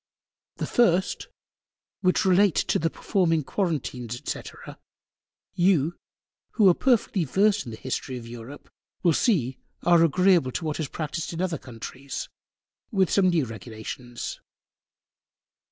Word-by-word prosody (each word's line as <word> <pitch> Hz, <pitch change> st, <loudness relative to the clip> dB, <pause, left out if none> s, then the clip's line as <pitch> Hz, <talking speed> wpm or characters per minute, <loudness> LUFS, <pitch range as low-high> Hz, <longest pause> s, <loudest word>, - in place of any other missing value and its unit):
The -, -, -3 dB
first, 190 Hz, -6 st, +2 dB, 0.7 s
which 185 Hz, -1 st, +2 dB
relate 190 Hz, 0 st, +4 dB
to -, -, +1 dB
the 165 Hz, -, +1 dB
performing 165 Hz, -3 st, +1 dB
Quarentines, 130 Hz, -, -2 dB
&c. -, -, -2 dB, 1.1 s
You, 175 Hz, -3 st, +2 dB, 0.6 s
who 215 Hz, -4 st, +5 dB
are -, -, +6 dB
perfectly 225 Hz, -5 st, +2 dB
versed 200 Hz, +7 st, +2 dB
in 120 Hz, -, -7 dB
the 110 Hz, -, -7 dB
History 130 Hz, +1 st, -4 dB
of 120 Hz, -, -9 dB
Europe, 120 Hz, +4 st, -10 dB, 0.4 s
will 170 Hz, -3 st, +4 dB
see 140 Hz, -, +1 dB, 0.2 s
are 170 Hz, -1 st, +5 dB
agreable 175 Hz, -3 st, +4 dB
to 170 Hz, -, -3 dB
what 155 Hz, 0 st, -2 dB
is 155 Hz, -, -1 dB
practised 160 Hz, +3 st, -4 dB
in 165 Hz, -, -5 dB
other 175 Hz, -5 st, -1 dB
Countries, 130 Hz, +3 st, -7 dB, 0.6 s
with 195 Hz, -5 st, +2 dB
some 190 Hz, -2 st, +4 dB
new 165 Hz, -6 st, +2 dB
Regulations. 115 Hz, +2 st, -7 dB
165 Hz, 130 wpm, -26 LUFS, 130-185 Hz, 1.1 s, are